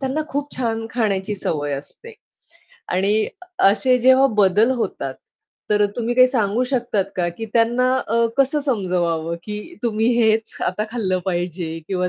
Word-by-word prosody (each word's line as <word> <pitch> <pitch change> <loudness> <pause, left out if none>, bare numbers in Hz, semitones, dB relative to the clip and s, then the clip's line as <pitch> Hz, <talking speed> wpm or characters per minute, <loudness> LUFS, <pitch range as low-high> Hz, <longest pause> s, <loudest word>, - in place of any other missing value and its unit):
त्यांना 270 +3 -1
खूप 285 +1 -4
छान 225 -3 -2
खाण्याची 210 -3 -1
सवय 145 -6 -2
असते. 445 - -10 0.8
आणि 205 +3 +2 0.2
अ, 365 - -14 0.2
असे 250 +5 +3
जेव्हा 260 +2 +5
बदल 210 +4 +4
होतात, - - -3 0.6
तर 210 0 +4
तुम्ही 240 0 -1
काही 255 0 +7
सांगू 225 -1 0
शकतात 240 -6 -1
का, 175 -1 +1
की 225 - -4
त्यांना 240 +2 +3
अ, 230 +2 +2
कसं 275 +2 +3
समजवावं, 175 - -1
की 210 +11 -7
तुम्ही 225 -1 0
हेच 220 0 +1
आता 210 +4 -1
खाल्लं 200 -6 -1
पाहिजे, 175 -2 -3
किंवा 180 -1 0
220 Hz, 150 wpm, -21 LUFS, 190-250 Hz, 0.8 s, काही